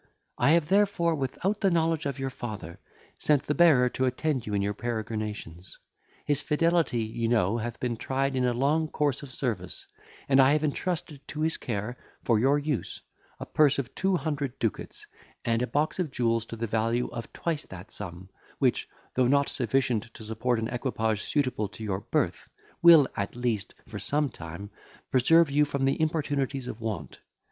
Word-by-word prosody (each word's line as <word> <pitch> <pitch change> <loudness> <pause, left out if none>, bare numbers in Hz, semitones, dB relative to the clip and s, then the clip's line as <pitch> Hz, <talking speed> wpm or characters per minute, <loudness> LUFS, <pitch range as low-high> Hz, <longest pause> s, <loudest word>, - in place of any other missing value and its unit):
I 140 +6 +5
have 165 -3 +3
therefore, 195 -4 +3
without 165 +8 -2
the 195 - +4
knowledge 165 -3 +1
of 140 -2 -3
your 135 -1 -3
father, 105 -9 -7 0.4
sent 150 -2 +3
the 150 - -1
bearer 150 -7 +6
to 130 - -1
attend 130 0 -1
you 105 - -1
in 100 - +1
your 100 +1 0
peregrinations; 105 -6 -5 0.5
his 145 -2 +1
fidelity 160 -6 +2
you 115 +1 -2
know 115 -1 +2
hath 120 +1 -5
been 120 -2 -2
tried 135 +3 -1
in 130 - +1
a 125 - +2
long 145 +6 +2
course 145 -3 0
of 140 -3 -9
service, 110 -10 -3 0.4
and 135 0 +6
I 135 +2 +5
have 155 0 +1
entrusted 155 -1 -2
to 155 - -5
his 160 +1 +1
care, 115 +2 -4 0.3
for 115 -3 +3
your 135 +5 +4
use, 145 -4 -2 0.4
a - - -5
purse 150 -2 +3
of 130 -2 -3
two 190 0 +1
hundred 140 -4 -3
ducats, 115 - -3 0.4
and 115 0 +1
a 125 - 0
box 150 +6 0
of 175 -4 0
jewels 115 -3 0
to - - -6
the 115 +1 -2
value 115 +2 0
of 115 -1 -7
twice 160 -3 -3
that 95 +2 -10
sum, 90 -2 -7 0.3
which, - - +1 0.2
though 125 -1 +3
not 140 +2 +3
sufficient 120 -2 0
to - - -9
support 115 +3 0
an 110 0 -1
equipage 115 -4 -1
suitable 130 -7 0
to 110 - -10
your 100 -3 -1
birth, - - -1 0.3
will, 165 -5 +8
at 100 +3 -3
least 115 -4 -2
for 105 -2 -6
some 145 +4 0
time, 85 +1 -9 0.4
preserve 160 +5 +5
you 145 +1 +4
from 140 -2 -1
the 135 +3 +1
importunities 145 -4 -1
of 115 - -6
want. 110 -2 -4
130 Hz, 185 wpm, -28 LUFS, 115-150 Hz, 0.5 s, will